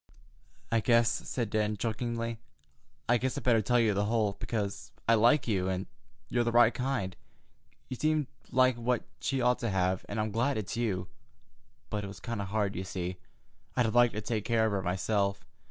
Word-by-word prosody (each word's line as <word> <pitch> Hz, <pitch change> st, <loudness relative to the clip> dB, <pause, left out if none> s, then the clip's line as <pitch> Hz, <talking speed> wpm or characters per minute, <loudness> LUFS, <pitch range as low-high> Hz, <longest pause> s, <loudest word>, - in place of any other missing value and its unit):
"I 115 Hz, -, +3 dB
guess," 115 Hz, 0 st, +4 dB, 0.2 s
said 115 Hz, -5 st, -2 dB
Dan 105 Hz, -1 st, 0 dB
chokingly—"I 115 Hz, -, -4 dB
guess 130 Hz, +3 st, -1 dB
I -, -, -2 dB
better 115 Hz, -2 st, +3 dB
tell 120 Hz, +4 st, +2 dB
you 110 Hz, -3 st, +3 dB
the 100 Hz, +1 st, +1 dB
whole, 105 Hz, -2 st, +1 dB
because 105 Hz, -4 st, -3 dB, 0.2 s
I 115 Hz, -, +6 dB
like 120 Hz, +6 st, +4 dB
you, 95 Hz, -4 st, +1 dB
and 95 Hz, 0 st, -2 dB, 0.4 s
you're 120 Hz, -1 st, +1 dB
the 120 Hz, -, 0 dB
right 120 Hz, 0 st, +6 dB
kind. 125 Hz, -8 st, -2 dB, 0.7 s
You 130 Hz, -, -5 dB
seem 155 Hz, +2 st, +1 dB, 0.2 s
like 130 Hz, -1 st, +3 dB
what 120 Hz, 0 st, 0 dB, 0.2 s
she 135 Hz, 0 st, -1 dB
ought 125 Hz, 0 st, +3 dB
to 115 Hz, -, -1 dB
have, 95 Hz, -1 st, 0 dB
and 105 Hz, -, -3 dB
I'm 110 Hz, 0 st, -1 dB
glad 120 Hz, +5 st, +1 dB
it's 105 Hz, -2 st, -3 dB
you—but—it 100 Hz, 0 st, -6 dB
was 100 Hz, -, -9 dB
kind 115 Hz, -4 st, -4 dB
of 100 Hz, -, -4 dB
hard, 105 Hz, 0 st, 0 dB
because, 95 Hz, 0 st, -6 dB
you 90 Hz, -1 st, -1 dB
see, -, -, -29 dB, 0.6 s
I'd 125 Hz, -, +4 dB
have 110 Hz, -, 0 dB
liked 120 Hz, -2 st, +4 dB
to 110 Hz, -, -2 dB
take 110 Hz, 0 st, -2 dB
care 115 Hz, -1 st, +2 dB
of 110 Hz, -, +1 dB
her 100 Hz, -1 st, 0 dB
myself. 100 Hz, +2 st, 0 dB
110 Hz, 190 wpm, -30 LUFS, 100-120 Hz, 0.7 s, I